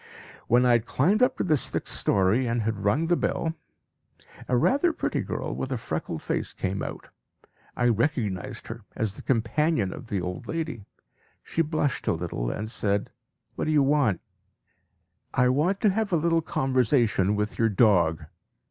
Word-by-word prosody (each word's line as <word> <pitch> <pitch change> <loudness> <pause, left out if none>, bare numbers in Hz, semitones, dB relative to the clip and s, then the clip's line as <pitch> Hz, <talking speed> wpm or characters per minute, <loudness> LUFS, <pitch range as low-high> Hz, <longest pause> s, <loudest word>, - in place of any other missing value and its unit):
When 125 +2 +4
I 125 - +5
had 120 -1 +2
climbed 195 - +2
up 255 +1 +3
to - - 0
the 160 -4 +3
sixth 140 - -1
story, 100 +6 +2
and 115 -1 0
had 110 -2 -2
rung 120 +11 +2
the 175 +1 +3
bell, 165 -1 -1 0.9
a 125 - +2
rather 285 - +3
pretty - - -1
girl - - -4
with 130 - -4
a 130 - 0
freckled 80 -6 -4
face - - -2
came 95 +1 -3
out. - - -6 0.7
I 120 - +2
recognised 115 - -1
her - - -8
as 110 -3 -1
the - - -9
companion 120 - +1
of - - -10
the 100 -4 -1
old 90 0 -5
lady. 155 -11 -4 0.6
She 165 - -1
blushed 155 -3 -1
a - - +3
little 80 -8 -3
and 105 - -3
asked 100 -2 -1 0.4
"What - - -3
do 155 - 0
you 150 -2 +4
want?" 135 - +2 1.1
"I 125 0 +4
want 160 +10 +1
to 210 - +4
have 215 +1 -1
a 170 - +3
little 165 +1 +2
conversation 125 - +1
with 105 +1 -3
your 115 -1 +3
dog." 90 -7 +3
120 Hz, 175 wpm, -26 LUFS, 100-155 Hz, 1.1 s, I